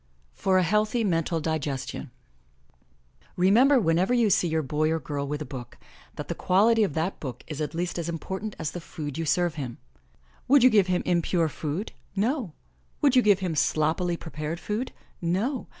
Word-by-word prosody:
FOR 190 Hz, -, +1 dB
A 185 Hz, -, +4 dB
HEALTHY 215 Hz, +5 st, +1 dB
MENTAL 165 Hz, -3 st, 0 dB
DIGESTION 150 Hz, -4 st, -3 dB, 1.3 s
Remember, 240 Hz, +10 st, +5 dB
whenever 185 Hz, +4 st, +2 dB
you 230 Hz, -4 st, +3 dB
see 175 Hz, -, +3 dB
your 160 Hz, -1 st, 0 dB
boy 150 Hz, +3 st, 0 dB
or 160 Hz, 0 st, 0 dB
girl 140 Hz, -1 st, -4 dB
with 150 Hz, +1 st, -3 dB
a -, -, -10 dB
book, 125 Hz, -3 st, -8 dB, 0.4 s
that -, -, -6 dB
the -, -, -2 dB
quality 220 Hz, +4 st, +3 dB
of 175 Hz, -9 st, -1 dB
that 165 Hz, +4 st, -1 dB
book 130 Hz, -4 st, -6 dB
is 155 Hz, -1 st, -6 dB
at 155 Hz, +2 st, -3 dB
least 175 Hz, +1 st, -2 dB
as 170 Hz, 0 st, -3 dB
important 190 Hz, +5 st, -4 dB
as 155 Hz, -3 st, -3 dB
the 175 Hz, -, -6 dB
food 155 Hz, -2 st, -6 dB
you 165 Hz, -, -1 dB
serve 170 Hz, +2 st, +1 dB
him. 120 Hz, -3 st, -6 dB, 0.7 s
Would 275 Hz, -1 st, +6 dB
you 255 Hz, -, +7 dB
give 205 Hz, -4 st, +4 dB
him 180 Hz, -1 st, 0 dB
impure 170 Hz, -1 st, +1 dB
food? 155 Hz, +8 st, -4 dB, 0.2 s
No! 225 Hz, -, -1 dB, 0.5 s
Would 275 Hz, -3 st, +5 dB
you 255 Hz, -, +7 dB
give 205 Hz, -4 st, +4 dB
him 180 Hz, -3 st, -1 dB
sloppily 160 Hz, +3 st, +1 dB
prepared 155 Hz, 0 st, -5 dB
food? 215 Hz, +7 st, -3 dB, 0.3 s
No! 200 Hz, +10 st, -1 dB
175 Hz, 180 wpm, -26 LUFS, 155-210 Hz, 1.3 s, you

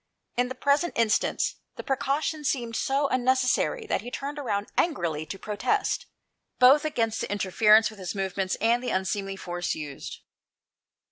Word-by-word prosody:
In 245 Hz, +1 st, +1 dB
the 260 Hz, -, -5 dB
present 285 Hz, +6 st, +1 dB
instance, 225 Hz, -2 st, +1 dB, 0.2 s
the -, -, -7 dB
precaution 275 Hz, +4 st, -1 dB
seemed 240 Hz, -5 st, -1 dB
so 275 Hz, +4 st, +1 dB
unnecessary 260 Hz, -, +1 dB
that -, -, -1 dB
he 240 Hz, -, -7 dB
turned 285 Hz, +3 st, -5 dB
about 205 Hz, -7 st, -2 dB
angrily 165 Hz, -, 0 dB
to 195 Hz, -, -6 dB
protest, 215 Hz, -, -1 dB, 0.5 s
both 270 Hz, +4 st, +7 dB
against 230 Hz, -7 st, 0 dB
the -, -, -4 dB
interference 210 Hz, +3 st, +4 dB
with 215 Hz, -, -14 dB
his 185 Hz, +1 st, -5 dB
movements, 190 Hz, -1 st, -1 dB
and 235 Hz, +2 st, +2 dB
the 250 Hz, -, -3 dB
unseemly 195 Hz, +1 st, -1 dB
force 175 Hz, -2 st, -3 dB
used. 145 Hz, -3 st, -7 dB
230 Hz, 150 wpm, -27 LUFS, 195-275 Hz, 0.5 s, both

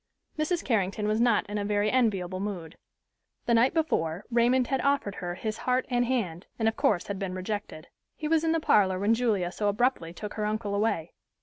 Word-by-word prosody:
Mrs. 325 Hz, +3 st, -1 dB
Carrington 210 Hz, -3 st, 0 dB
was 215 Hz, +2 st, +1 dB
not 235 Hz, -3 st, +3 dB
in 205 Hz, +1 st, -3 dB
a -, -, -1 dB
very 205 Hz, +1 st, +1 dB
enviable 195 Hz, -8 st, +1 dB
mood. 185 Hz, -5 st, -5 dB, 0.7 s
The 235 Hz, -, +2 dB
night 235 Hz, +3 st, +5 dB
before 180 Hz, -, -1 dB
Raymond 240 Hz, +2 st, +3 dB
had 270 Hz, +1 st, -1 dB
offered 280 Hz, -8 st, +1 dB
her 175 Hz, -1 st, -3 dB
his 215 Hz, +3 st, -4 dB
heart 255 Hz, 0 st, +1 dB
and 245 Hz, 0 st, +2 dB
hand, 205 Hz, -9 st, -2 dB
and 225 Hz, -, +1 dB
of 225 Hz, -, +1 dB
course 250 Hz, -, +1 dB
had 200 Hz, -1 st, -4 dB
been 190 Hz, -2 st, -3 dB
rejected. 185 Hz, -4 st, -5 dB, 0.3 s
He 305 Hz, -, -4 dB
was 320 Hz, 0 st, +2 dB
in 325 Hz, -, +2 dB
the 330 Hz, -, +2 dB
parlor 190 Hz, -10 st, +3 dB
when 205 Hz, +4 st, +2 dB
Julia 215 Hz, -7 st, +1 dB
so 205 Hz, +2 st, -2 dB
abruptly 205 Hz, -5 st, 0 dB
took 210 Hz, +4 st, -7 dB
her 215 Hz, -, -2 dB
uncle 210 Hz, -1 st, -2 dB
away. 200 Hz, -6 st, 0 dB
210 Hz, 205 wpm, -28 LUFS, 190-245 Hz, 0.7 s, night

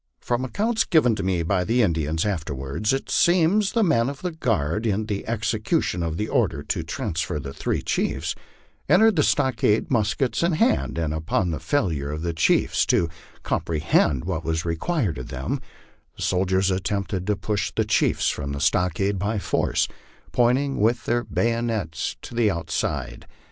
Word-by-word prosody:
From 120 Hz, +1 st, -1 dB
accounts 220 Hz, -, 0 dB
given 140 Hz, -, +3 dB
me 90 Hz, -3 st, 0 dB
by 90 Hz, +2 st, +1 dB
the 120 Hz, +6 st, +2 dB
Indians 80 Hz, -3 st, 0 dB
after 80 Hz, -8 st, -2 dB
wards, 70 Hz, +11 st, -2 dB
it 135 Hz, 0 st, -2 dB
seems 180 Hz, +4 st, +3 dB
the 230 Hz, -, +3 dB
men 135 Hz, -, +2 dB
of 140 Hz, +2 st, -8 dB
the 180 Hz, -, -1 dB
guard, 110 Hz, -, -1 dB
in 105 Hz, +1 st, 0 dB
the 105 Hz, -2 st, -4 dB
execution 110 Hz, -, 0 dB
of 80 Hz, -1 st, -2 dB
the 105 Hz, -, -1 dB
order 100 Hz, -, 0 dB
to -, -, -2 dB
transfer 80 Hz, -2 st, -3 dB
the 70 Hz, -1 st, -7 dB
three -, -, -2 dB
chiefs, -, -, -1 dB, 0.6 s
entered 220 Hz, -2 st, +5 dB
the 155 Hz, -, +3 dB
stockade 130 Hz, -7 st, +2 dB
muskets 115 Hz, +2 st, +1 dB
in 170 Hz, 0 st, +2 dB
hand, 225 Hz, -, +1 dB
and 80 Hz, -2 st, -1 dB
upon 90 Hz, +4 st, 0 dB
the 80 Hz, -, -3 dB
failure 80 Hz, -, -1 dB
of 75 Hz, +2 st, -4 dB
the 85 Hz, -1 st, -1 dB
chiefs 80 Hz, -, +2 dB
to 85 Hz, -, +2 dB, 0.3 s
comprehend 75 Hz, -4 st, +1 dB
what 85 Hz, -3 st, -2 dB
was 80 Hz, 0 st, -1 dB
required 85 Hz, -, -1 dB
of 65 Hz, -, -7 dB
them, 65 Hz, 0 st, -3 dB, 0.5 s
the -, -, -6 dB
soldiers 95 Hz, +1 st, +1 dB
attempt 100 Hz, +1 st, -2 dB
ed 95 Hz, 0 st, -2 dB
to 105 Hz, -, +2 dB
push 105 Hz, 0 st, -2 dB
the -, -, +1 dB
chiefs -, -, +2 dB
from 70 Hz, -1 st, -2 dB
the 70 Hz, -, -4 dB
stockade 90 Hz, +5 st, +1 dB
by 105 Hz, +3 st, -1 dB
force, 100 Hz, -, 0 dB, 0.4 s
pointing 130 Hz, +3 st, +2 dB
with 115 Hz, +3 st, +2 dB
their 120 Hz, +1 st, +1 dB
bayo 115 Hz, 0 st, 0 dB
nets 110 Hz, -9 st, -2 dB
to -, -, -9 dB
the 115 Hz, -2 st, +3 dB
outside. 85 Hz, -4 st, -3 dB
100 Hz, 175 wpm, -24 LUFS, 80-120 Hz, 0.6 s, entered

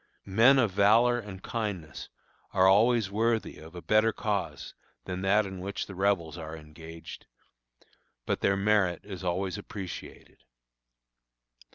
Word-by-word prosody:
Men 115 Hz, +8 st, +5 dB
of 115 Hz, -6 st, +3 dB
valor 115 Hz, +5 st, +4 dB
and 100 Hz, -4 st, -9 dB
kindness 100 Hz, -, -5 dB, 0.4 s
are 95 Hz, 0 st, +5 dB
always 110 Hz, +1 st, +4 dB
worthy 115 Hz, +2 st, 0 dB
of 80 Hz, +2 st, -13 dB
a 90 Hz, -, -8 dB
better 110 Hz, +5 st, +3 dB
cause 105 Hz, -2 st, -3 dB, 0.3 s
than 90 Hz, 0 st, -4 dB
that 100 Hz, +2 st, +3 dB
in 95 Hz, -1 st, -7 dB
which 100 Hz, +2 st, -4 dB
the 95 Hz, -, -10 dB
Rebels 90 Hz, -4 st, 0 dB
are 80 Hz, 0 st, -7 dB
engaged; 80 Hz, +2 st, -11 dB, 1.0 s
but -, -, -1 dB
their 100 Hz, 0 st, +2 dB
merit 100 Hz, -4 st, +2 dB
is 95 Hz, -3 st, -8 dB
always 95 Hz, +2 st, -2 dB
appreciated. 95 Hz, -3 st, -9 dB
100 Hz, 135 wpm, -28 LUFS, 90-105 Hz, 1.0 s, Men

